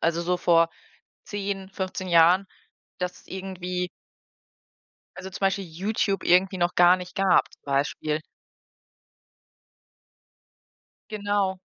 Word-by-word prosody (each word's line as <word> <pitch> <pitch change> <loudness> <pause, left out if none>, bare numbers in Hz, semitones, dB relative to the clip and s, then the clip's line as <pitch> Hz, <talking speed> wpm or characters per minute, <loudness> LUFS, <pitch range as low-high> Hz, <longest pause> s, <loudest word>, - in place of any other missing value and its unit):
Also, 170 +1 +1
so 180 +1 0
vor 165 -1 +4 0.6
10, 200 -2 -4
15 185 -1 -4
Jahren, 175 +3 +5 0.5
dass 180 0 -3
es - - -23
irgendwie 180 -1 -4 1.3
also, 190 0 -7
zum - - -9
Beispiel 195 0 +1
YouTube 195 +3 -1
irgendwie 185 +2 +4
noch 175 0 +1
gar 175 +1 +6
nicht 180 0 -9
gab 195 -2 +3
zum - - -21
Beispiel. 145 +2 -1 2.9
Genau. 205 -3 -1
185 Hz, 105 wpm, -25 LUFS, 175-195 Hz, 2.9 s, gar